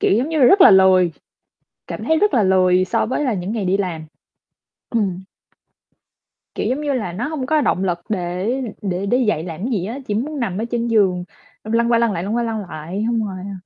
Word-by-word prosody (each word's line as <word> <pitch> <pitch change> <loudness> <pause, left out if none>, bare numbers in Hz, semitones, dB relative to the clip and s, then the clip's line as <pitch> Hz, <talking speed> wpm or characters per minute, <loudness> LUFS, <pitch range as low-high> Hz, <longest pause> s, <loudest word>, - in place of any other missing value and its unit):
kiểu, - - +2
giống 270 +6 -1
như 320 -1 -1
là 265 - +5
rất 385 +10 +6
là - - +9
lười, 185 -3 +5 0.8
cảm - - -6
thấy 320 0 +2
rất 420 - +2
là 230 -5 +3
lười 185 -1 +3
so 225 +4 0
với 255 +6 -2
là 255 - 0
những 185 +1 -4
ngày 210 -4 -2
đi 190 +2 +1
làm. 170 -5 -3 0.8
Ừm. 190 -5 -1 1.3
Kiểu, - - -2
giống 270 +4 -1
như 290 -2 -1
là, 205 -9 -3
nó 240 +9 -3
hông 300 -5 -4
có 310 +2 +2
động 190 - 0
lực 175 -2 -1
để 180 +2 -2 0.3
để 190 -1 -2
đứng 245 +5 +1
dậy 160 -6 0
làm 165 -2 -7
cái 255 - -2
gì 190 -5 -1
á, 240 +6 -5
chỉ 205 - -1
muốn 285 +7 -3
nằm 200 -7 -2
ở 225 - -2
trên 235 0 -1
giường 190 -6 +2 0.4
xong 220 +1 -5
lăn 235 +1 +2
qua 235 - +4
lăn 230 -1 +2
lại, 175 -2 -3
lăn 210 +4 -2
qua 240 - 0
lăn 225 -2 -2
lại, 170 +7 -5
xong 230 -2 0
rồi, 190 - -6
ờ 190 -2 -9
210 Hz, 240 wpm, -20 LUFS, 185-240 Hz, 1.3 s, là